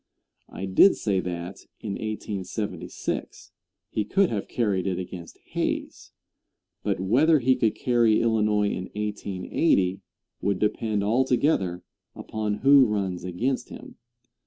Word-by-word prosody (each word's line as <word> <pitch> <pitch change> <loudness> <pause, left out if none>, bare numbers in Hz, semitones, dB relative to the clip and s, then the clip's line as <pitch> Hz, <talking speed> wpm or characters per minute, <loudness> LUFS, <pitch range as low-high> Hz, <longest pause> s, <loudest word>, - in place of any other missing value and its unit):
I 95 - -6
did 95 - +6
say 100 -3 0
that 90 +1 -6
in 105 - -5
1876, 105 -2 -5 0.4
he 105 - 0
could 190 - +2
have 105 -3 -3
carried 100 -6 0
it 95 -2 -1
against 90 -2 -7
Hayes; - - -3 0.7
but - - -1
whether 135 - +4
he 130 -1 +3
could 115 -4 +1
carry 120 -3 +3
Illinois 105 -2 +2
in 90 - -4
1880 100 - 0 0.4
would 100 -2 0
depend 105 +1 0
altogether 115 - +1 0.3
upon 105 -1 -3
who 140 -2 +7
runs 95 -4 -2
against 115 +9 -2
him. - - -11
105 Hz, 120 wpm, -25 LUFS, 95-115 Hz, 0.7 s, who